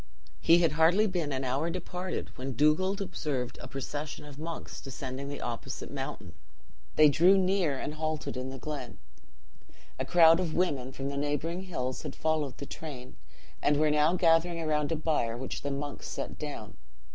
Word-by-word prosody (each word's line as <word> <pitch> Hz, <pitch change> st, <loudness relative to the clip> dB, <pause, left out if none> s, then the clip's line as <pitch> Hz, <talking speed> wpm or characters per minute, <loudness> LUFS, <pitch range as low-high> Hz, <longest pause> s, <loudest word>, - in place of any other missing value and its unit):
"He 165 Hz, -, +6 dB
had 165 Hz, -, +4 dB
hardly 165 Hz, +7 st, +5 dB
been 175 Hz, -7 st, -1 dB
an 135 Hz, 0 st, -1 dB
hour 135 Hz, +6 st, 0 dB
departed 180 Hz, +1 st, -4 dB
when 135 Hz, +1 st, -4 dB
Dugald 185 Hz, +7 st, +3 dB
observed 150 Hz, -9 st, -3 dB
a -, -, -7 dB
procession 145 Hz, +2 st, -5 dB
of 145 Hz, -1 st, -11 dB
monks 165 Hz, +1 st, -6 dB
descending 135 Hz, +1 st, -5 dB
the 145 Hz, -, -5 dB
opposite 120 Hz, +2 st, -5 dB
mountain. 135 Hz, -, -5 dB, 0.6 s
They 155 Hz, -, +8 dB
drew 175 Hz, +7 st, +6 dB
near 185 Hz, -6 st, +2 dB
and 145 Hz, -, -4 dB
halted 155 Hz, 0 st, -3 dB
in 130 Hz, +1 st, -3 dB
the 135 Hz, -, -6 dB
glen. 140 Hz, -3 st, -6 dB, 1.0 s
A -, -, +1 dB
crowd 165 Hz, -1 st, +7 dB
of 170 Hz, -4 st, -1 dB
women 140 Hz, -8 st, 0 dB
from 135 Hz, +1 st, -4 dB
the 140 Hz, -, -4 dB
neighboring 150 Hz, +6 st, -1 dB
hills 130 Hz, -8 st, -3 dB
had -, -, -6 dB
followed 155 Hz, -4 st, 0 dB
the 140 Hz, -, -6 dB
train, 135 Hz, -5 st, -8 dB, 0.5 s
and 145 Hz, -, +3 dB
were 155 Hz, 0 st, +3 dB
now 150 Hz, +3 st, +4 dB
gathering 170 Hz, 0 st, +3 dB
around 150 Hz, -1 st, 0 dB
a -, -, +2 dB
bier 150 Hz, -7 st, 0 dB
which 130 Hz, +1 st, -5 dB
the 140 Hz, -, -2 dB
monks 140 Hz, +1 st, -4 dB
set -, -, -5 dB
down. -, -, -6 dB
150 Hz, 175 wpm, -30 LUFS, 135-165 Hz, 1.0 s, They